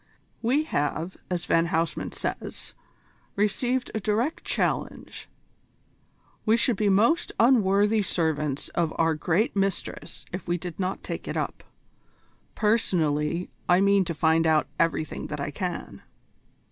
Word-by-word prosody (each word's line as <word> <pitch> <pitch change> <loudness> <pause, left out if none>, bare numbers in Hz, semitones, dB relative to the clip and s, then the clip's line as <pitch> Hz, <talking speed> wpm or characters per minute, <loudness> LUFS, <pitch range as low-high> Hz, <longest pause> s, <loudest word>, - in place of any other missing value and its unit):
"We 260 +7 +2
have, 165 - -2
as 180 -1 -2
Van 165 0 +3
Huysman 165 0 -1
says, - - -5 0.6
received 245 +5 0
a 220 - -1
direct 220 +8 -1
challenge. - - -2 1.1
We 220 +1 +4
should 235 0 +2
be 205 +1 +1
most 225 - +3
unworthy 210 -3 +4
servants 150 -6 -1
of 165 -2 0
our 165 0 +3
great 175 +9 0
Mistress 195 -1 -2
if 180 - -5
we 175 0 +1
did 175 0 -7
not 185 0 -2
take - - -5
it - - -3
up. - - -3 0.9
Personally, 170 -7 +1 0.2
I 175 +1 +6
mean 200 0 +4
to 170 - -3
find 160 +2 +3
out 155 -1 +3
everything 155 -1 0
that 150 - -5
I 140 +1 -3
can." 180 +2 -5
185 Hz, 135 wpm, -26 LUFS, 160-215 Hz, 1.1 s, I